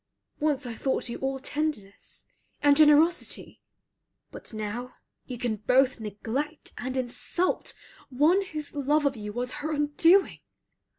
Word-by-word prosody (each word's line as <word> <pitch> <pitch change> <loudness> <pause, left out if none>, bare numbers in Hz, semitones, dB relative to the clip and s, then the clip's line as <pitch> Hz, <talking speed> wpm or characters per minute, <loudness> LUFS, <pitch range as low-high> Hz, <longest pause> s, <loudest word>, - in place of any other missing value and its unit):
Once 295 -3 0
I 240 - -4
thought 260 +1 -1
you 235 - -5
all 270 0 -2
tenderness, 275 -8 -4 0.4
and 290 -1 +6
generosity, 310 +3 +3 0.7
but - - -9
now 220 +3 -5 0.3
you 250 - -6
can 230 -2 -2
both 255 +4 +2
neglect 225 +8 -4
and 255 +1 -3
insult 260 +8 -1 0.3
one 305 +9 +3
whose 305 -5 -6
love 295 +1 +1
of 275 -1 +1
you 210 -2 -6
was 245 +3 -3
her 310 +2 -2
undoing. 310 +6 +3
270 Hz, 130 wpm, -27 LUFS, 245-300 Hz, 0.7 s, and